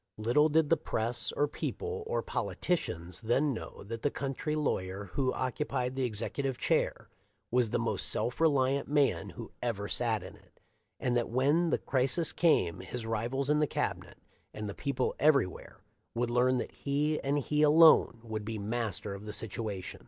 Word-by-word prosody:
Little 120 +8 +3
did 155 0 +2
the 165 - +5
press, 115 -5 -1
or 145 - +1
people, 445 - -4
or 485 +2 -1
politicians 90 - -2
then 135 +5 +1
know 115 - -8
that 115 +3 -6
the 145 - +1
country 140 +2 -3
lawyer 100 -9 -2
who 130 -2 +1
occupied 130 0 -2
the 130 -1 0
executive 125 +4 -3
chair - - 0 0.4
was 125 -2 +2
the - - 0
most - - +1
self 125 +6 0
reliant 140 -3 +2
man 140 - +1
who - - -9
ever 105 -4 -2
sat 115 -2 +1
in - - -10
it, - - -24 0.4
and 125 -1 0
that 120 -1 0
when 145 +8 +2
the - - +2
crisis 135 +5 +1
came 90 - +2
his 110 +6 -6
rivals 120 +6 -1
in 150 - +3
the 150 - +2
Cabinet, - - -3 0.4
and 105 0 -4
the 100 - -4
people 135 0 -1
everywhere, 140 - +1 0.3
would 120 0 0
learn 125 +1 +3
that 120 - -3
he 150 +2 -1
and 140 +2 0
he 150 +1 0
alone 155 -6 +6
would 110 -2 -4
be 110 +1 -4
master 105 -1 -3
of 100 +2 -9
the - - -4
situation. 105 -3 -3
125 Hz, 175 wpm, -31 LUFS, 110-145 Hz, 0.4 s, alone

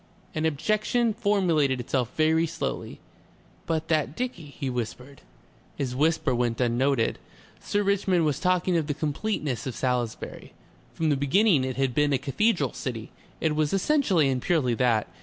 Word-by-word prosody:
An 155 0 0
objection 215 - +1
formulated 180 - +1
itself 125 0 -1
very 160 +1 +3
slowly. 165 +1 -4 0.7
"But 160 -1 -1
that 155 -2 +1
dicky," 245 -10 -4
he 140 -1 -6
whispered. 125 +2 -5 0.5
His 125 -3 -3
whisper 160 0 +2
went 120 -1 0
unnoted. 125 0 +1 0.4
Sir 205 0 -1
Richmond 190 -4 +2
was 150 -2 0
talking 180 0 +1
of 155 -3 -1
the 145 - -1
completeness 150 - -2
of 130 - -4
Salisbury. 125 -3 -3 0.4
From 160 -1 0
the 145 - +3
very - - -4
beginning 190 -3 +4
it 130 -1 -3
had 135 -2 0
been 145 +2 +2
a - - +3
cathedral 150 - 0
city; 115 -4 -5 0.3
it 155 -2 0
was 155 +1 0
essentially 195 - +2
and 130 -2 0
purely 145 -8 +1
that. 115 -2 +2
150 Hz, 160 wpm, -26 LUFS, 130-175 Hz, 0.7 s, beginning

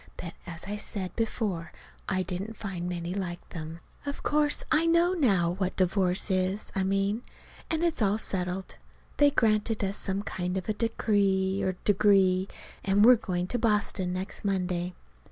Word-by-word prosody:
But, 170 -1 -6
as 165 -2 -6
I 205 +2 -4
said 200 -3 -3
before, 210 -7 -2 0.4
I 185 -1 +1
didn't 190 +5 -5
find 180 -4 -4
many 175 0 -3
like 180 -3 -4
them. 160 0 -7 0.2
Of 285 0 -5
course 295 0 +2
I 320 +2 +4
know 340 +2 +4
now 195 - +3
what 185 +1 -2
divorce 185 +1 +1
is, 185 +2 0
I 195 - 0
mean. 195 +3 +1 0.5
And 320 +1 0
it's 335 -7 +1
all 205 0 +3
settled. 185 -2 -3 0.4
They 290 0 +6
granted 220 -4 +1
us 195 +1 -1
some 195 0 -2
kind 180 -2 -3
of 185 - -4
a 215 - +1
decree 200 -4 +1
or 185 - 0
degree, 195 -2 +4 0.4
and 200 +2 +4
we're 250 +1 +9
going 180 -5 -2
to 245 - -1
Boston 210 -5 +1
next 185 +2 -4
Monday. 180 -3 -1
195 Hz, 165 wpm, -28 LUFS, 180-215 Hz, 0.5 s, we're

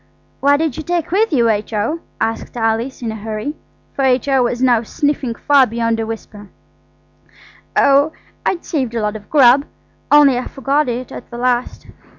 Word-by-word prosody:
"What 285 +1 +4
did 315 -3 -2
you - - -3
take 345 0 -2
with 420 +3 +2
you, 240 -6 +3
H.O.?" 220 +7 -1 0.2
asked 225 +2 -3
Alice 230 +3 -1
in 225 - -2
a - - -6
hurry, 220 +7 -5 0.4
for - - -2
H.O. 265 +1 +2
was 240 0 0
now 245 -3 +3
sniffing 270 0 -2
far 275 -1 +4
beyond 230 0 -1
a 225 - -2
whisper. 210 -2 -8 1.3
"Oh, 280 +2 +4 0.3
I'd 345 - -2
saved 260 -7 -2
a 230 - -1
lot 210 0 -1
of 210 -1 -10
grub, 275 -2 +5 0.5
only 285 -4 +6
I 250 - -5
forgot 275 +1 0
it 245 +1 -4
at - - -9
the 235 - -8
last. 245 0 -1
250 Hz, 170 wpm, -18 LUFS, 225-285 Hz, 1.3 s, only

